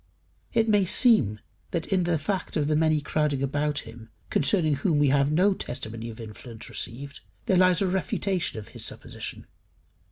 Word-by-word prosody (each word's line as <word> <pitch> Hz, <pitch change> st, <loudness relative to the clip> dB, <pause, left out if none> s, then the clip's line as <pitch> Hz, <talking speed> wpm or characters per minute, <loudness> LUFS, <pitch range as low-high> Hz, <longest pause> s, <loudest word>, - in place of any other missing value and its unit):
It 225 Hz, 0 st, +2 dB
may 205 Hz, -2 st, +4 dB
seem 180 Hz, -, +4 dB, 0.3 s
that 170 Hz, -2 st, -2 dB
in 185 Hz, -2 st, +2 dB
the 170 Hz, -1 st, +1 dB
fact 185 Hz, +4 st, -3 dB
of 150 Hz, -, +1 dB
the 155 Hz, -, +2 dB
many 155 Hz, -1 st, +3 dB
crowding 145 Hz, -1 st, 0 dB
about 145 Hz, +2 st, 0 dB
him, 115 Hz, 0 st, -12 dB, 0.2 s
concerning 155 Hz, -2 st, +2 dB
whom 150 Hz, +2 st, +1 dB
we 145 Hz, -1 st, +4 dB
have 140 Hz, +1 st, +3 dB
no 185 Hz, +6 st, +4 dB
testimony 115 Hz, -7 st, -5 dB
of 115 Hz, +1 st, -10 dB
influence 110 Hz, +1 st, -9 dB
received, 140 Hz, +4 st, -5 dB, 0.3 s
there 195 Hz, -6 st, +3 dB
lies 185 Hz, 0 st, +4 dB
a -, -, +1 dB
refutation 190 Hz, -, -1 dB
of 105 Hz, -, -8 dB
his -, -, -9 dB
supposition. -, -, -7 dB
150 Hz, 170 wpm, -26 LUFS, 130-185 Hz, 0.3 s, may